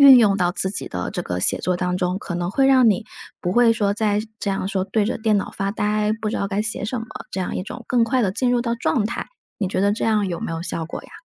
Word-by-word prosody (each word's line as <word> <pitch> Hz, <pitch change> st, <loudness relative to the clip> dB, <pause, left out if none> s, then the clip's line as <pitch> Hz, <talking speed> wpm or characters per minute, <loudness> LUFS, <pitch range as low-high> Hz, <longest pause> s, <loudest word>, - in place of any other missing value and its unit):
运 275 Hz, -2 st, +10 dB
用 205 Hz, -4 st, +4 dB
到 180 Hz, -2 st, +2 dB
自 190 Hz, +1 st, -1 dB
己 200 Hz, -, -4 dB
的 90 Hz, 0 st, -3 dB
这 -, -, -3 dB
个 90 Hz, -, -3 dB
写 -, -, +2 dB
作 180 Hz, -1 st, 0 dB
当 180 Hz, 0 st, -1 dB
中。 180 Hz, 0 st, -1 dB
可 195 Hz, -, -6 dB
能 175 Hz, 0 st, -2 dB
会 270 Hz, +6 st, +3 dB
让 260 Hz, -4 st, +6 dB
你， 210 Hz, +2 st, -1 dB, 0.4 s
不 180 Hz, -, -1 dB
会 240 Hz, +1 st, +5 dB
说 205 Hz, -3 st, 0 dB
再 210 Hz, -1 st, +1 dB, 0.2 s
这 200 Hz, -, -1 dB
样 195 Hz, -1 st, -2 dB
说 195 Hz, -1 st, -1 dB
对 205 Hz, +2 st, 0 dB
着 225 Hz, -, -1 dB
电 220 Hz, -2 st, +2 dB
脑 -, -, -4 dB
发 195 Hz, 0 st, -2 dB
呆， 210 Hz, +1 st, 0 dB
不 215 Hz, -, -1 dB
知 -, -, -3 dB
道 200 Hz, -, -1 dB
该 200 Hz, +1 st, -1 dB
写 220 Hz, -1 st, -3 dB
什 235 Hz, +4 st, -2 dB
么， 225 Hz, -, -6 dB, 0.2 s
这 190 Hz, -, -3 dB
样 180 Hz, -, -3 dB
一 -, -, -2 dB
种 240 Hz, +5 st, -8 dB
更 245 Hz, -1 st, +2 dB
快 250 Hz, +3 st, +2 dB
地 195 Hz, -5 st, +1 dB
进 250 Hz, +4 st, +1 dB
入 245 Hz, -1 st, +2 dB
到 235 Hz, -1 st, -1 dB
状 230 Hz, -2 st, 0 dB
态， 230 Hz, -, -5 dB, 0.3 s
你 195 Hz, -, -1 dB
觉 185 Hz, -, -1 dB
得 200 Hz, +1 st, +3 dB
这 215 Hz, -, -2 dB
样 215 Hz, -2 st, +2 dB
有 175 Hz, -2 st, -3 dB
没 -, -, -3 dB
有 165 Hz, 0 st, -3 dB
效 165 Hz, -2 st, -3 dB
果 165 Hz, -, -6 dB
呀？ -, -, -15 dB
205 Hz, 320 characters per minute, -22 LUFS, 185-230 Hz, 0.4 s, 运